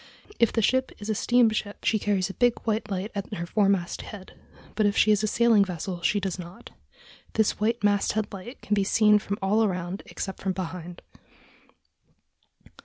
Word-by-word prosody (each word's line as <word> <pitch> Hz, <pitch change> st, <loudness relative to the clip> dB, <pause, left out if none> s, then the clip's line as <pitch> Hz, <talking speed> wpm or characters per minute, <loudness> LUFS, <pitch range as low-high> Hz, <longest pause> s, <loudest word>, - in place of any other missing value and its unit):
If 235 Hz, -, +4 dB
the 225 Hz, -, 0 dB
ship 260 Hz, +4 st, +2 dB
is 210 Hz, +1 st, -4 dB
a -, -, +2 dB
steamship 220 Hz, -2 st, +1 dB
she 215 Hz, -, +2 dB
carries 195 Hz, -3 st, 0 dB
a 195 Hz, -, -7 dB
big 245 Hz, +1 st, +2 dB
white 220 Hz, -1 st, -1 dB
light 195 Hz, +2 st, -3 dB
at 200 Hz, +1 st, -5 dB
her 170 Hz, -, -4 dB
foremast 195 Hz, -2 st, +1 dB
head, 195 Hz, -3 st, -10 dB, 0.4 s
but 215 Hz, -1 st, +2 dB
if 200 Hz, -, -1 dB
she 215 Hz, -, +5 dB
is 210 Hz, -1 st, +3 dB
a 215 Hz, -, 0 dB
sailing 225 Hz, -1 st, +4 dB
vessel 180 Hz, -1 st, -5 dB
she 205 Hz, +4 st, +2 dB
does 190 Hz, -2 st, -3 dB
not. 175 Hz, +1 st, -10 dB, 0.6 s
This 220 Hz, -2 st, +1 dB
white 225 Hz, +1 st, 0 dB
masthead 205 Hz, +1 st, +1 dB
light 200 Hz, +7 st, -9 dB
can 210 Hz, -, -1 dB
be 200 Hz, -1 st, +3 dB
seen 210 Hz, +1 st, +4 dB
from 200 Hz, 0 st, -4 dB
all 210 Hz, +4 st, +3 dB
around 180 Hz, -1 st, -2 dB
except 190 Hz, -, -6 dB
from 190 Hz, -1 st, -1 dB
behind.... 180 Hz, -1 st, -6 dB
205 Hz, 180 wpm, -26 LUFS, 190-215 Hz, 0.6 s, she